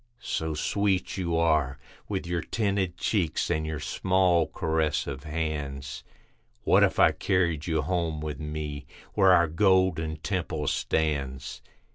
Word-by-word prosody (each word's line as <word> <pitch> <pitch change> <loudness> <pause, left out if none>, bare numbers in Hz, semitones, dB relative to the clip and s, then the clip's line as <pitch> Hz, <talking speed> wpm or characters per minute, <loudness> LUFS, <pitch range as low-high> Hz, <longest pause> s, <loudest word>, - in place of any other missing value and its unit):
So 80 -1 -2
sweet 100 +4 0
you 85 -3 -1
are, 75 -5 +2 0.3
with 95 -3 -2
your 85 -1 -1
tinted 100 -3 -1
cheeks 85 -8 0
and 80 0 0
your 80 -1 -3
small 90 -1 +2
caressive 80 -3 -1
hands, 75 -3 -4 0.6
What - - +4
if - - +3
I - - +6
carried 85 -4 0
you 80 -3 +1
home 85 -1 -1
with 75 -1 -5
me, 75 -2 -5 0.3
where 95 -2 +5
our 85 -2 +5
Golden 95 -2 +2
Temple 80 -3 -3
stands? 70 -4 -1
80 Hz, 130 wpm, -27 LUFS, 75-90 Hz, 0.6 s, I